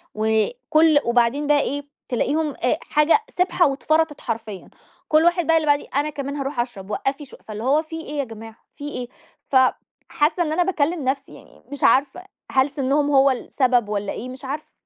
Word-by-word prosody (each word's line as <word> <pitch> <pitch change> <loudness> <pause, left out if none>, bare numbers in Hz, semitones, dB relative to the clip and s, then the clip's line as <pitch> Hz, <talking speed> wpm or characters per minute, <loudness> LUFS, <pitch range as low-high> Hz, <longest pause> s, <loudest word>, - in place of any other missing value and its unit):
وكُلّ 310 - +2
وبعدين 240 +5 +2
بقى 295 0 +4
إيه، 285 +2 -3 0.3
تلاقيهم 290 +4 0
آآ 250 +5 +2
حاجة 300 +6 +3 0.2
سبحة 360 -1 +3
واتفرطت 305 +2 0
حرفيًا، 220 -5 -5 0.4
كُلّ 310 +1 +4
واحد 345 -1 +2
بقى 325 0 +5
اللي 310 -1 -1
بعديه 290 0 +2
"أنا 290 +2 +1
كمان 280 -1 -5
هاروح 275 -2 -4
أشرب، 225 -6 -4
وقفي 275 +5 -2
شو" 260 - -15
فاللي 215 0 -6
هو 285 +5 +3
في 320 0 -7
إيه 295 -2 -6
يا - - +1
جماعة، 225 -2 -10 0.2
في 290 0 -6
إيه؟ 250 -4 -5 0.4
ف - - -3 0.5
حاسة 325 +3 +1
إن 310 - -3
أنا 350 +3 +2
باكلِّم 335 -3 0
نفسي 270 +1 -2
يعني - - -17
مش 285 - -7
عارفة، 280 +6 +3 0.3
هل 265 +1 +3
سنهم 285 +1 0
هو 275 -1 +5
السبب 250 -3 0
والّا 205 -1 -2
إيه، 250 - -6
مش 260 +1 -10
عارفة. 290 +3 -5
285 Hz, 185 wpm, -22 LUFS, 250-310 Hz, 0.5 s, بقى